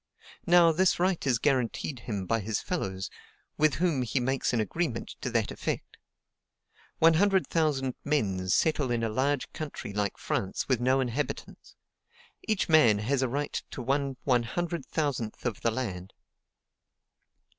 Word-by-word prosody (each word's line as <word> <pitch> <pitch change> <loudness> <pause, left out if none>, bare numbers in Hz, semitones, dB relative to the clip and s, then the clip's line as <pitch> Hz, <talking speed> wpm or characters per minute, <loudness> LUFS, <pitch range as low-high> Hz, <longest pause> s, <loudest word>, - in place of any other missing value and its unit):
Now, 170 -1 +7
this 180 +3 +2
right 180 -5 +1
is 125 -3 +3
guaranteed 130 0 0
him 105 -5 -4
by 115 +5 +1
his 105 +1 -2
fellows, 95 - -3 0.4
with 155 0 +3
whom 165 -5 +1
he 125 +2 0
makes 130 +1 0
an 120 - +1
agreement 125 +2 -2
to - - -2
that 115 -3 0
effect. - - -4 1.0
One 165 0 +6
hundred 195 +2 +3
thousand 145 -6 0
men 95 -11 0
settle 145 - +2
in 120 -1 0
a 115 - 0
large 135 +4 0
country 145 -9 -6
like 105 -1 -1
France 95 - -2
with 130 -4 +2
no 130 +2 +3
inhabitants: 130 +2 -4 0.7
each 215 -3 +1
man 140 -10 +6
has 125 +6 0
a 130 - +1
right 145 +4 -2
to 125 - -6
1/100,000 135 0 -1
of 120 -5 -2
the 115 - +2
land. 100 -7 -4
130 Hz, 145 wpm, -28 LUFS, 115-155 Hz, 1.0 s, Now